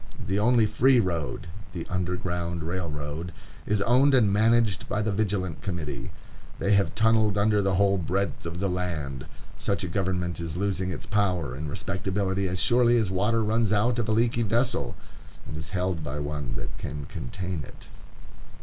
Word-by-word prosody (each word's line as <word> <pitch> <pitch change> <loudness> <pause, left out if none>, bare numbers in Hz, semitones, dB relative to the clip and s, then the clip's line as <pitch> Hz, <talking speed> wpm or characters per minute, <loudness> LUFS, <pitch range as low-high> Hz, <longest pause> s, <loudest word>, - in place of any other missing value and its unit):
The 95 +2 0
only 115 +1 +4
free 125 +4 +4
road, 85 -8 -1 0.3
the 85 -3 -4
Underground 90 -2 -2
Railroad, 80 -1 -4 0.4
is 105 -1 +2
owned 130 +5 +5
and 105 -6 +4
managed 110 -1 +3
by 105 - 0
the 110 - 0
Vigilant 95 -5 -1
Committee. 85 -7 -4 0.5
They 100 - 0
have 100 0 +2
tunnelled 110 -2 +3
under 105 0 +3
the 95 -1 +1
whole 100 0 +3
breadth 95 +1 -1
of 85 +1 -5
the 100 - 0
land. 80 -8 -3 0.3
Such 100 0 -1
a - - -1
government 90 -1 -1
is 85 -1 -4
losing 95 -1 -1
its 90 - -5
power 90 - 0
and 75 +3 -5
respectability 95 +2 -1
as 95 0 -2
surely 120 +2 +4
as 110 -5 +1
water 105 +4 +2
runs 110 0 +1
out 115 +4 +2
of 110 - -1
a - - +2
leaky 115 +1 +2
vessel, 115 - 0 0.5
and - - -6
is 80 0 -5
held 90 -3 -1
by 75 0 -4
one 70 -4 -3
that - - -6
can 70 0 -5
contain 90 +7 -5
it. - - -13
95 Hz, 170 wpm, -27 LUFS, 85-105 Hz, 0.5 s, owned